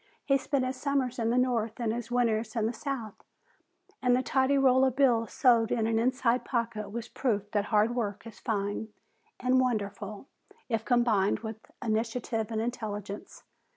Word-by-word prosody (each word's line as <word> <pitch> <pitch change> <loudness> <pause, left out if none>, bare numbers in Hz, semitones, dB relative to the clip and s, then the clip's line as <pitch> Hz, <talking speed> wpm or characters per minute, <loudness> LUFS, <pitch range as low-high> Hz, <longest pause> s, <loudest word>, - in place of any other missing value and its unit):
He 275 -1 +3
spent 270 -1 0
his 255 0 -3
summers 270 -4 -1
in 225 -1 +1
the 240 - +2
north 235 -3 0
and 225 -2 0
his 235 0 -5
winters 230 -2 0
in 225 -2 +1
the 225 - 0
south, 240 -4 -5 0.8
and 250 -2 +4
the 255 - +1
tidy 265 +1 +2
roll 260 -1 +5
of 260 -2 +2
bills 240 -5 +3
sewed 235 -3 +4
in 225 -2 +1
an 225 0 +1
inside 250 0 +1
pocket 230 -4 -2
was 235 +2 -5
proof 210 -7 -1
that 205 -1 +1
hard 215 +2 +2
work 210 -3 -3
is 225 -4 -11
fine 205 -1 -2 0.5
and 255 +1 +3
wonderful 210 -2 -3 0.4
if 225 -2 0
combined 230 -5 +2
with 220 -1 -5 0.3
initiative 225 0 -1
and 220 -1 -1
intelligence. 210 -4 -5
230 Hz, 170 wpm, -29 LUFS, 220-255 Hz, 0.8 s, roll